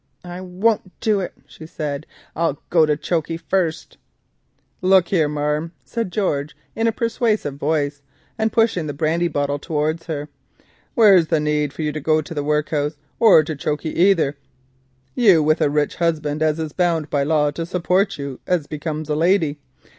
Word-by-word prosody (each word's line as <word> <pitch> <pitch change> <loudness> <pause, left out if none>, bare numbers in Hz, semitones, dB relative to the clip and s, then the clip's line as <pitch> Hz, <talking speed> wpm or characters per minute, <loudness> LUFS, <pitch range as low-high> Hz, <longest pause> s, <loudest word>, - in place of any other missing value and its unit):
"I 175 +1 -7
won't 185 +2 -1
do 215 -2 +1
it," 185 - -4
she 155 - -12
said, 150 -2 -5 0.3
"I'll 165 -3 0
go 160 -3 +5
to 150 -1 +1
chokey 165 0 -2
first——" 170 -1 -2 0.8
"Look 185 -1 +4
here, 160 -6 +2
marm," 150 +3 -2
said 225 - -3
George, 150 -8 -1 0.2
in 225 +1 +1
a - - +3
persuasive 225 - -1
voice, 145 -1 -1 0.3
and 220 0 0
pushing 225 -8 +1
the 145 - -5
brandy 165 +3 +1
bottle 145 -2 -1
towards 155 +3 -2
her, 150 -3 -4 0.7
"where's 195 -8 +6
the 160 -1 +2
need 150 -1 0
for 155 - -5
you 150 - 0
to 155 - -4
go 155 +2 +2
to 155 - -6
the 145 -2 -2
workhus 150 0 -1 0.2
or 215 -9 +7
to 155 +1 -4
chokey 150 +2 -3
either—you 140 - +1
with 155 +1 +2
a - - +3
rich 150 0 0
husband 155 -3 -1
as 155 0 +2
is 160 -2 -4
bound 170 -4 0
by 145 - +1
law 150 0 +2
to 165 +3 -4
support 180 +3 0
you 140 -2 -6
as 175 -5 +1
becomes 155 0 -5
a 150 - -1
lady? 160 -3 +2
155 Hz, 170 wpm, -21 LUFS, 150-180 Hz, 0.8 s, or